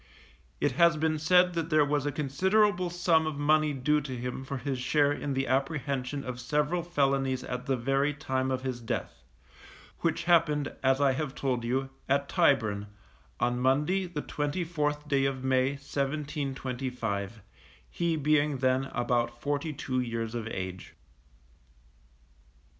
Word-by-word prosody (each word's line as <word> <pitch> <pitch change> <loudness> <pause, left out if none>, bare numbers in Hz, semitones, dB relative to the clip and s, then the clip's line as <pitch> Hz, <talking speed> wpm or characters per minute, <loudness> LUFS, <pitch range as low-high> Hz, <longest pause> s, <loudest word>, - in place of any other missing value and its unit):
It - - +2
has 170 -2 +6
been 155 0 0
said 180 +3 +4
that 165 -1 -2
there 155 -2 +4
was 145 0 0
a - - 0
considerable 180 +7 +2
sum 170 -2 +2
of 155 -2 -3
money 155 +1 +3
due 150 +2 +1
to 130 -3 -5
him 125 +2 -4
for 135 +1 -4
his 130 0 -3
share 145 +3 +2
in 145 -1 -3
the 135 0 0
apprehension 135 0 -1
of 125 -1 -5
several 150 +7 0
felonies 135 -6 0
at 125 +1 -5
the 135 -1 +1
very 135 +4 +1
time 130 -3 -2
of 130 0 -2
his 130 -2 -3
death, 115 - -4 0.8
which - - 0
happened, 155 -4 +2
as 135 0 +3
I 140 -1 +4
have 135 0 -3
told 125 -3 -1
you, 135 +3 -1 0.2
at 140 +1 +2
Tyburn, 110 - +2 0.5
on 120 0 +1
Monday, 150 +9 +2
the 160 -4 -5
24th 150 -1 -2
day 140 -2 +2
of 135 -1 -2
May, 130 +1 +2
1725; 135 - -3 0.4
he 170 - -1
being 150 -1 +2
then 130 +1 +1
about 120 -2 -1
forty 145 +4 -2
two 130 -2 -2
years 115 -2 -3
of 115 -2 -4
age. 95 -4 -6
140 Hz, 150 wpm, -29 LUFS, 130-150 Hz, 0.8 s, has